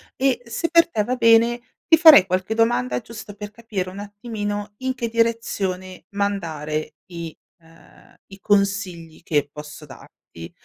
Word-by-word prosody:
e, 265 -2 +1
se 235 +9 -3
per 335 0 +5
te 215 -9 0
va 255 +4 -2
bene, 235 0 +4 0.3
ti 325 - +7
farei 315 - +8
qualche 185 +4 -2
domanda 125 - +1
giusto 215 -3 -10
per 205 0 -8
capire 210 -5 -5
un 195 - -9
attimino 205 0 -5
in 260 0 -3
che 235 -2 -3
direzione 205 -5 -2
mandare 160 -7 -3 0.2
i 170 -2 -7 0.2
ehm, 165 0 -21 0.2
i 195 - -12
consigli 195 -6 -1
che 150 -4 0
posso 150 0 -10
darti, 85 - -13
205 Hz, 145 wpm, -22 LUFS, 170-230 Hz, 0.3 s, farei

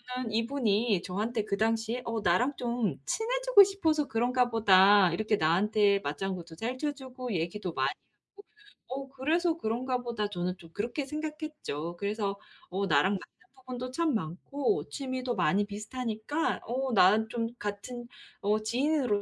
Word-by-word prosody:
저는 250 -3 -3
이분이 230 -4 +1
저한테 210 +5 -2
그 200 - -1
당시에 225 +2 0
'어 230 -1 -2
나랑 240 +11 +2
좀 235 - -1
친해지고 - - +5
싶어서 320 -7 +1
그런가 245 +2 +1
보다. 200 -3 +6
이렇게 215 +4 +1
나한테 200 +5 +3
맞장구도 170 +2 -4
잘 240 +8 -3
쳐 295 +2 -1
주고 255 -4 -7
얘기도 175 +1 -2
많이 - - +1 0.5
하고. 405 - -13 0.4
어 270 +1 -5
그래서 320 +6 +1
그런가 250 0 -1
보다.' 230 -3 -2
저는 180 -1 -3
좀 170 -3 -14
그렇게 235 - -2
생각했죠. 300 - -5
그래서 200 0 -2 0.3
.어 195 +2 -1
나랑 155 +3 +3
맞는 195 - -9
부분도 255 -1 -6
참 325 +2 +1
많고 235 - -1
취미도 255 -3 -3
많이 190 +2 +2
비슷하니까 220 +7 -3
어 260 +1 -1
나는 210 +3 +5
좀 230 0 -1
같은 220 +4 -5 0.3
어 210 +2 +2
지인으로 250 -1 +1
225 Hz, 320 characters per minute, -30 LUFS, 200-260 Hz, 0.5 s, 보다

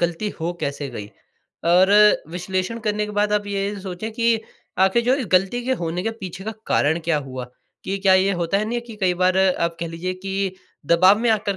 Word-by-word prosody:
ग़लती 175 +5 -1
हो 170 +2 -1
कैसे 140 0 -3
गई? 105 -4 -7 0.6
और 180 +3 +5 0.4
विश्लेषण 185 +5 -3
करने 210 0 0
के 210 - -7
बाद 210 0 +1
आप 205 0 0
ये 200 0 -2
सोचें 190 +3 -5
कि 230 -1 +2 0.4
आख़िर 190 +5 +3
जो 255 +2 +3 0.2
ग़लती 195 +7 +2
के 260 - 0
होने 170 +2 -2
के 225 - -1
पीछे 190 +1 -7
का 220 - -3
कारण 155 +3 +2
क्या 165 -2 +2
हुआ? 130 -2 -6 0.4
कि 195 +1 -2
क्या 190 -1 +4
ये 190 +1 +3
होता 175 +4 0
है 210 - -1
नहीं 240 0 -1
कि 225 -2 -10
कई 180 -2 +2
बार 185 +1 +2
आप 170 -3 +1
कह 170 - -2
लीजिए 175 +3 -4
की 195 0 -3 0.3
दबाव 185 +6 +5
में 235 0 0
आकर 205 -2 0
190 Hz, 210 wpm, -22 LUFS, 175-210 Hz, 0.6 s, और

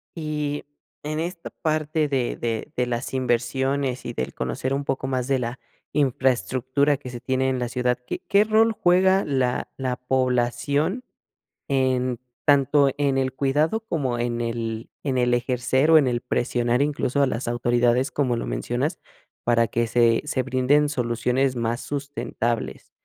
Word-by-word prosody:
Y 150 -2 -3 0.4
en 155 +1 -3
esta 170 +1 -4
parte 155 0 0
de 130 -3 0
de 115 +4 -3
de 125 - +1
las 120 +1 -3
inversiones 130 +1 0
y 120 - -4
del 65 - -3
conocer 65 - -2
un 140 - -1
poco 135 -1 -2
más 130 -2 -1
de 135 -1 +2
la 120 +1 -4 0.3
infraestructura 130 +1 +1
que 130 -2 -9
se 120 -1 -7
tiene 130 0 0
en 130 - -1
la 120 -1 -2
ciudad, 125 0 0
¿qué - - -4
qué 200 +1 +5
rol 220 +1 +3
juega 190 +1 +4
la 130 -4 0
la 130 -2 -1
población 130 - 0 0.6
en 130 -2 +1 0.3
tanto 140 -1 +4
en 140 -2 +1
el 130 0 0
cuidado 145 +9 +1
como 130 - -1
en 120 0 -1
el 115 -1 -3
en 135 -3 -1
el 125 -1 +2
ejercer 130 +4 +1
o 160 - +9
en 140 - +4
el 120 -1 0
presionar 120 0 0
incluso 140 -1 0
a 140 - +4
las 120 -1 -3
autoridades, 120 +2 +2
como 130 -4 0
lo - - -3
mencionas, - - -2 0.4
para 115 -1 +3
que 115 +2 0
se 115 0 +3
se 135 -3 -1
brinden 140 +4 +2
soluciones 125 0 0
más 120 +1 -1
sustentables, 140 -5 -3
130 Hz, 160 wpm, -24 LUFS, 120-145 Hz, 0.6 s, o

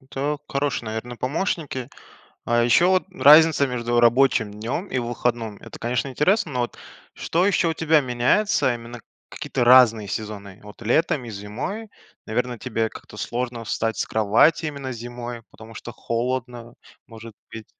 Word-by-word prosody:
Это 140 +2 -3
хорошие, 140 -4 -2
наверно, 115 +2 -5
помощники. 140 -2 -3 0.6
А 120 0 +2
ещё 145 +9 +4
вот 185 -1 +2
разница 155 -3 +6
между 120 -1 0
рабочим 120 -2 +3
днём 115 - -4
и 130 - -2
выходном- 120 -2 -2
это - - -11
конечно 120 +1 -2
интересно. 155 - +1
Но 125 - -1
вот 120 - -3 0.4
что 175 +3 0
ещё 180 -4 +2
у 160 - -2
тебя 160 -1 +3
меняется, 130 - +1
именно 120 0 -9 0.3
какие-то - - -3
разные 120 -4 +6
сезоны. 100 -2 -6
Вот 105 +1 -13
летом 125 +3 +1
и 115 - -8
зимой, 120 - -6 0.4
наверно 120 +2 -2
тебе 115 -2 -2
как-то 105 - -13
сложно 120 +1 -4
встать 110 +1 -2
с - - -1
кровати 110 +10 +3
именно 140 -3 -5
зимой, 120 0 -7
потому 110 0 -14
что 120 - -8
холодно, 120 0 -4 0.3
может 115 -2 -12 0.2
быть? 110 -1 -8
120 Hz, 150 wpm, -23 LUFS, 115-140 Hz, 0.6 s, разница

